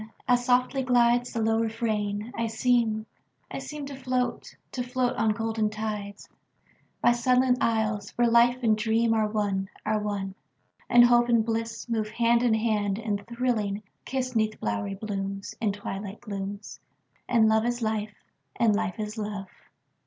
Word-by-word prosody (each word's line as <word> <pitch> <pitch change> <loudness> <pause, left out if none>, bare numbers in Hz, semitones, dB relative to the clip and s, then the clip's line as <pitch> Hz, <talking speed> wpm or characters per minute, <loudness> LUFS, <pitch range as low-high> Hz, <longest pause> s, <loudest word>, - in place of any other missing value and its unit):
As 245 -1 +3
softly 250 +2 +2
glidesThe 240 -2 +2
low 225 0 +2
refrain, 220 -1 -2
I 230 0 -1
seem, 225 -1 +1 0.5
I - - -4
seemTo 285 -2 -6
float, 255 -1 -2 0.2
to 255 - -3
float 250 0 -1
on 220 -1 +2
golden 225 -1 -1
tides, 210 -2 -5 0.7
By - - +5
sunlit 250 +1 +3
isles, 220 -2 0
where 240 0 +3
life 240 +2 +4
and 220 -2 +4
dreamAre 220 0 +1
one, 200 -3 -1 0.2
are 215 0 +1
one; 200 -2 -3 0.6
and 240 0 +8
hope 240 0 +4
and 230 -2 +3
blissMove 225 -1 -2
hand 235 0 +3
in 240 -3 +3
hand, 210 -3 0
and 210 -3 -2
thrilling, 230 -4 -1 0.2
kiss'Neath 250 -5 -1
bowery 105 - -2
blooms, 195 -1 -4
In 215 -3 +2
twilight 200 0 -6
glooms, 200 -1 -6 0.5
And 230 -3 +5
love 220 +1 +3
is 240 0 -2
life, 215 -1 -2 0.4
and 220 -3 +3
life 185 -3 -2
is 215 +1 -4
love. 205 -2 -4
220 Hz, 145 wpm, -27 LUFS, 210-240 Hz, 0.7 s, and